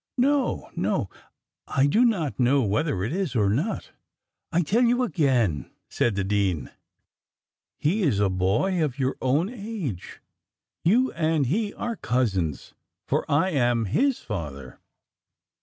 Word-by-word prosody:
"No, 275 +2 +1
no, - - -1 0.6
I 135 -1 +2
do 215 +12 +4
not 180 - 0
know 130 +2 +3
whether 110 - 0
it 115 - -2
is 180 -8 -2
or 100 -4 +3
not." 155 - -2 0.6
"I 175 +1 +2
tell 210 +10 +2
you 245 +1 +3
again," 130 - +1 0.2
said 115 -4 0
the 100 - 0
dean, 95 -8 0 1.1
"he 185 +9 +1
is 135 - +2
a 100 - +3
boy 100 - +1
of 140 -4 -2
your 135 -1 0
own 140 +7 +2
age; 205 - -6 0.6
you 245 +10 +3
and 160 -3 +1
he 205 - 0
are 235 -1 -4
cousins, 95 - -1 0.3
for - - -1
I 165 +7 +3
am 120 -6 +2
his 265 - +1
father." 70 - -7
140 Hz, 140 wpm, -25 LUFS, -, 1.1 s, do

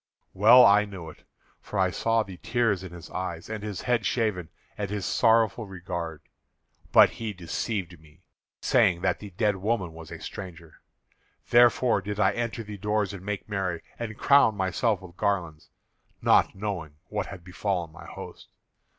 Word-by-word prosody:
"Well 115 +6 +8
I 105 +1 +6
knew 90 -6 -8
it; - - -21 0.3
for - - -7
I 95 -1 +2
saw 115 +4 +1
the 95 -3 -10
tears 110 -4 0
in 95 - -8
his 85 -2 -11
eyes, 85 -2 -5
and 110 -1 -4
his 105 -2 -5
head 120 -3 +1
shaven, 105 -8 -1 0.3
and 100 -2 -4
his 100 -1 -3
sorrowful 115 -1 +2
regard; 85 -4 -6 0.7
but - - +7
he 110 -2 -5
deceived 90 0 -4
me, 75 -1 -22 0.4
saying 85 -1 +3
that - - 0
the 105 - -9
dead 105 +2 0
woman 95 -3 -1
was 80 -1 -11
a - - -8
stranger. 85 -4 -9 0.7
Therefore 120 -2 +5
did 105 +2 -5
I 95 - +4
enter 115 0 -3
the 105 -1 -8
doors 105 -1 0
and 95 -2 -8
make 105 0 -4
merry, 95 -5 -2 0.2
and 110 -2 -5
crown 140 -6 +5
myself 100 +2 0
with 90 -1 -13
garlands, 85 -6 -2 0.5
not - - +3
knowing 95 -7 -4
what - - -2
had 95 -3 -9
befallen 90 -2 -3
my 85 - -12
host. - - -10
100 Hz, 165 wpm, -27 LUFS, 90-110 Hz, 0.7 s, Well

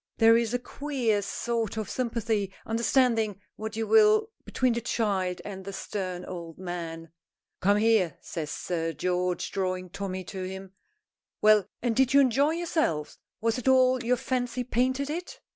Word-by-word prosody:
There 225 0 +7
is 230 -1 +1
a 245 - +1
queer 245 -5 -1
sort 225 +2 -2
of 220 - -2
sympathy 225 -5 -1
understanding 225 -3 +2 0.2
what 220 0 -6
you 225 0 -1
will 435 - +5
between 255 -2 +1
the 235 - -2
child 195 -6 -1
and 190 -2 -6
the 195 - -6
stern 185 -2 -4
old 170 -3 -7
man. 165 -3 -6 0.5
"Come 200 +2 +3
here," 210 -7 +3
says 155 -3 -5
Sir 165 0 -2
George, 180 +3 -1
drawing 185 -2 -2
Tommy 190 0 -4
to 190 +1 -7
him. 190 +1 -7 0.7
"Well, 215 -2 +5 0.2
and 240 -2 +1
did 265 +1 +3
you - - +9
enjoy 275 +3 +3
yourself? 315 - -1 0.2
Was 230 +2 +1
it 250 - -6
all 255 -1 +4
your 250 +2 +2
fancy 250 -1 -2
painted 260 +4 0
it?" 345 +3 -5
220 Hz, 160 wpm, -28 LUFS, 185-250 Hz, 0.7 s, you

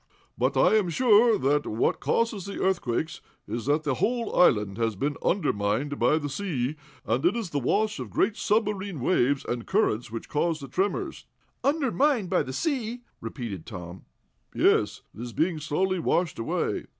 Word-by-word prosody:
But - - 0
I 220 - +5
am 195 -5 +1
sure 225 +3 +5
that 145 +2 +1
what 110 - 0
causes 225 -5 0
the 200 - -5
earthquakes 160 -6 -1 0.3
is 115 +4 -4
that 150 +2 +2
the 145 - 0
whole 235 - -1
island 105 - +3
has 115 -2 0
been 145 +8 -1
undermined 140 - 0
by 155 - +4
the 145 -2 -3
sea, 145 -4 -2 0.3
and 120 +6 0
it 175 +6 +3
is 220 -7 -3
the 145 - 0
wash 215 - 0
of - - -5
great 220 - +1
submarine 205 -6 0
waves 135 -1 +1
and 120 -1 -4
currents 125 - +1
which 115 0 -6
cause 160 +1 0
the 140 - -8
tremors." 205 - -2 0.4
"Undermined 275 - +1
by 185 - +3
the 130 - -5
sea?" 245 - -2 0.2
repeated 115 - -6
Tom. 90 -4 -8 0.5
"Yes. - - +2
It - - -10
is 120 -1 -6
being 165 -1 0
slowly 185 +5 0
washed 170 -2 0
away." 115 - -1
160 Hz, 170 wpm, -27 LUFS, -, 0.5 s, I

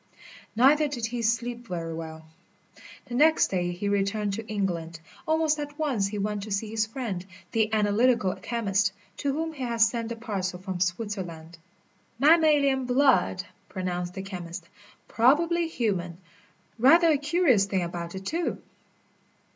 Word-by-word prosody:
Neither 290 +6 +5
did 250 -6 -3
he 235 +1 -3
sleep 235 +1 -1
very 165 -3 -4
well. 160 -1 -7 0.8
The 245 - -9
next 310 +5 +4
day 175 -2 -1
he 180 +3 -4
returned 200 +1 0
to 220 +2 -5
England. 170 -6 -3 0.3
Almost 315 -1 +2
at 290 0 -6
once 265 -11 0
he 210 +1 -5
went 205 0 -2
to 210 +1 -7
see 210 +2 -2
his 220 0 0
friend, 220 -7 -4 0.3
the 220 -1 +1
analytical 215 -1 +2
chemist, 205 -4 0 0.2
to 280 - -1
whom 320 +3 -3
he 280 - -10
had 235 -2 -2
sent 230 0 +2
the 235 - -4
parcel 195 -5 -3
from 185 0 -5
Switzerland. 180 -4 -3 0.6
"Mammalian 290 -2 +4
blood," 250 -7 +3 0.3
pronounced 180 -1 -4
the 190 - -5
chemist, 175 -3 -7 0.4
"probably 330 +8 +3
human 190 - -2 0.6
rather 330 +8 +6
a 300 - +3
curious 295 - +3
thing 190 -2 -1
about 170 0 -5
it, 190 0 -7
too." 335 - -1
220 Hz, 145 wpm, -27 LUFS, 185-265 Hz, 0.8 s, rather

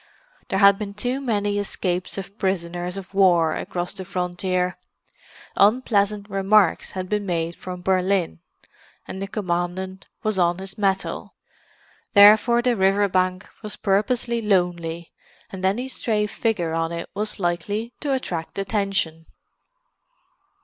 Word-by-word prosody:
There 195 - -1
had 200 0 +6
been 200 -1 -5
too 250 +6 -2
many 205 -5 0
escapes 185 -3 -2
of 195 +2 -8
prisoners 180 -1 -2
of 195 0 -9
war 175 -5 +4
across 175 +1 -3
the 195 -2 -6
frontier; 180 -1 -2 0.8
unpleasant 205 -2 +2
remarks 195 -1 +3
had 185 0 -3
been 210 +1 -1
made 170 -1 -1
from 180 -1 -8
Berlin, 185 - +1 0.7
and 190 - -6
the 195 - -3
Commandant 185 -1 -3 0.2
was 215 -3 0
on 175 0 +2
his 190 0 -7
mettle. 195 -2 -1 0.8
Therefore 220 +3 +7
the 245 -1 +2
river 195 +1 +3
bank 185 +1 0
was 215 -2 -4
purposely 230 +4 0
lonely, 175 -5 0 0.4
and 190 -2 -7
any 210 +7 +1
stray 220 -5 -1
figure 205 -6 -1
on 165 0 -1
it 170 0 -5
was 210 +2 -3
likely 205 +6 -2
to 290 - -2
attract 180 -13 -3
attention. 195 -5 -1
195 Hz, 130 wpm, -23 LUFS, 180-210 Hz, 0.8 s, Therefore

